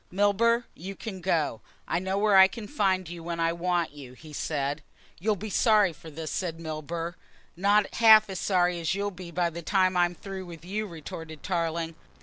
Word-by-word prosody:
"Milburgh, 205 +5 +3
you 195 +4 -8
can 190 -4 -7
go. 160 -10 0 0.3
I 170 - 0
know 190 +1 -2
where 205 0 +3
I 190 0 +9
can 210 +1 -8
find 190 - +1
you 170 0 -7
when 170 0 -4
I 165 0 +2
want 175 -1 0
you," 140 -4 -11
he 155 +4 -13
said. 145 0 -2 0.4
"You'll 210 +4 +1
be 210 +2 -6
sorry 210 -4 +4
for 160 - -12
this," 155 +1 -6
said 165 -3 -3
Milburgh. 165 +1 -4 0.4
"Not 200 +3 +2
half 220 -1 +7
as 190 -2 -5
sorry 180 -2 +2
as 165 +2 0
you'll 205 +1 -1
be 180 -2 -9
by 170 0 0
the 170 +1 -6
time 185 +1 +2
I'm 175 0 +2
through 190 0 -7
with 170 -1 -10
you," 210 +3 -3
retorted 160 -2 -9
Tarling. 165 -2 -1
175 Hz, 195 wpm, -27 LUFS, 165-200 Hz, 0.4 s, I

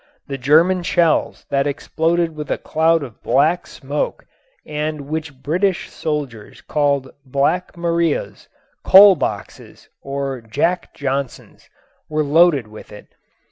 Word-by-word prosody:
The 135 -1 -6
German 165 +8 +4
shells 170 -1 +1
that 140 0 +1
exploded 165 +3 -1
with 150 -1 -7
a - - 0
cloud 160 0 +1
of 120 -6 -11
black 155 +6 +1
smoke 140 +2 -4 0.4
and 150 0 -3
which 145 -2 -6
British 180 +6 -1
soldiers 145 -9 -5
called 140 -3 0
"Black 140 +8 -1
Marias," 170 - -1 0.4
"coal 195 0 +8
boxes" 105 - -6
or 135 -2 -4
"Jack 150 +11 -2
Johnsons" 140 -2 -5 0.4
were 155 0 0
loaded 150 -3 +4
with 105 0 -13
it. 105 - -13
150 Hz, 120 wpm, -19 LUFS, 140-170 Hz, 0.4 s, coal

